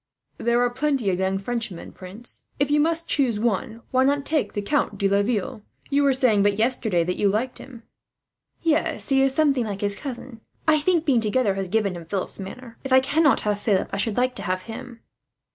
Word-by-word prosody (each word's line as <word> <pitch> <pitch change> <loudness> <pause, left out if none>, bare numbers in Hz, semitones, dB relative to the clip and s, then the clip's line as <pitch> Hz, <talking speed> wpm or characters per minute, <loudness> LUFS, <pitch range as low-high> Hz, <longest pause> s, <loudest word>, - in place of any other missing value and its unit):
"There 235 +1 +2
are 245 - +2
plenty 260 -5 0
of 180 - -2
young 190 0 0
Frenchmen, 220 -3 -4
prince. 195 +6 -8
If 285 0 +1
you 295 - +4
must 330 +2 +1
choose 245 -7 +2
one, 230 +1 -1
why 260 0 +3
not 280 +1 +1
take 310 -2 0
the 205 - -2
Count 210 -3 0
de 195 - +2
Laville? 210 +4 0 0.3
You 285 +1 +3
were 280 -1 +4
saying, 240 -6 +3
but 200 0 +2
yesterday, 220 -6 +1
that 180 +2 -2
you 205 - +3
liked 230 +6 -2
him." 240 -4 -12 0.8
"Yes, 310 -2 0
he 270 -1 +4
is 270 0 +2
something 280 -6 +2
like 200 -2 -5
his 205 -1 0
cousin. 245 -2 -8 0.3
I 310 -1 +5
think 335 +1 +1
being 255 -6 +3
together 215 -1 +1
has 195 -1 -3
given 200 -2 0
him 170 -1 -8
Philip's 195 +2 -3
manner. 230 +5 -9
If 270 - -6
I 260 - +8
cannot 290 +3 +3
have 210 -1 -1
Philip, 205 -3 +1
I - - -1
should 205 +1 -1
like 250 +1 +2
to - - -6
have 185 0 -2
him." 235 +1 -9
235 Hz, 210 wpm, -24 LUFS, 200-270 Hz, 0.8 s, I